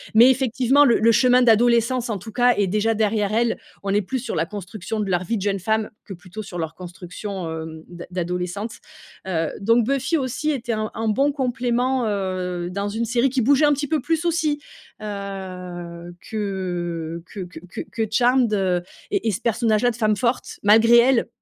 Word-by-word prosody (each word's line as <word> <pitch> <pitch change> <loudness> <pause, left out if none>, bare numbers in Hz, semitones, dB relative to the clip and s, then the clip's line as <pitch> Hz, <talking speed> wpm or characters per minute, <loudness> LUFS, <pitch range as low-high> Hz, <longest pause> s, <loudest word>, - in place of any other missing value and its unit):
Mais 240 +4 +8
effectivement, 260 +2 +3
le 245 -5 +5
le 230 +1 +5
chemin 250 +2 +5
d'adolescence 235 +2 +3
en 210 - -1
tout 220 +4 -10
cas 245 +1 +4
est 205 - +2
déjà 215 +3 +1
derrière 210 -1 +1
elle. 230 +1 +1 0.2
On 195 0 -1
est 205 - +3
plus 260 +7 -3
sur 240 -1 -4
la 165 +1 +1
construction 205 +2 -6
de 205 - -1
leur 180 0 +1
vie 225 +5 -1
de - - -5
jeune 200 -1 0
femme 220 +3 -1
que 195 - -7
plutôt 180 +4 -9
sur 185 -4 -8
leur 160 -1 -3
construction, 180 0 -7
hem, 160 0 -7
d'a 175 0 -9
d'adolescente. 180 +4 -3 0.6
Heu, 165 -4 0
donc 230 +2 +3
Buffy 275 +5 +1
aussi 265 +3 -2
était 240 -4 -2
un 215 0 -2
un 225 0 -2
bon 275 +6 +2
complément, 255 -1 0
heu, 185 -3 -2
dans 200 +2 -2
une 225 +3 -2
série 240 +3 +2
qui 260 0 0
bougeait 280 +5 +4
un 295 - +4
petit 290 +1 -2
peu 315 0 0
plus 330 +1 -1
aussi, 315 -3 +1 0.4
heu, 180 -4 -7
que 175 -5 -4
que 200 - -8
que 180 -3 -8
que - - -5
que 225 -1 -1
Charmed, 245 0 +3
heu, 185 -3 +1 0.3
et - - 0
et 220 - +3
ce 200 - -4
personnage 225 -2 +1
là 245 - +4
de 230 - -9
femme 215 -2 +2
forte 245 +1 -2
malgré 225 +3 +6
elle, 245 0 +4
215 Hz, 200 wpm, -22 LUFS, 185-245 Hz, 0.6 s, Mais